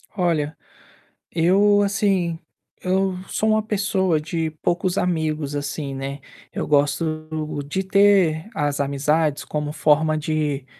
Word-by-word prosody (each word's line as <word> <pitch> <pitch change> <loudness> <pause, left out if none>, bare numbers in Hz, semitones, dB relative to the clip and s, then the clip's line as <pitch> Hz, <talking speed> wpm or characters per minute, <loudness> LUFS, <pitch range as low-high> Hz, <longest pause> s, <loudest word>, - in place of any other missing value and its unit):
Olha, 160 -5 0 0.7
eu, 200 +5 +4
assim, 195 -4 0 0.4
eu 190 0 +1
sou 220 - 0
uma 215 0 +3
pessoa 195 -5 0
de 160 +1 -2
poucos 175 +1 0
amigos, 155 -4 -1
assim, 145 0 -4
né, 135 +1 -5 0.3
eu - - -3
gosto 150 +2 +1 0.4
de 190 +6 -2
ter 195 -3 +3
as 145 -2 -1
amizades 145 +2 +1
como 150 -1 -3
forma 155 +1 +2
de 150 -3 -1
160 Hz, 115 wpm, -22 LUFS, 150-190 Hz, 0.7 s, eu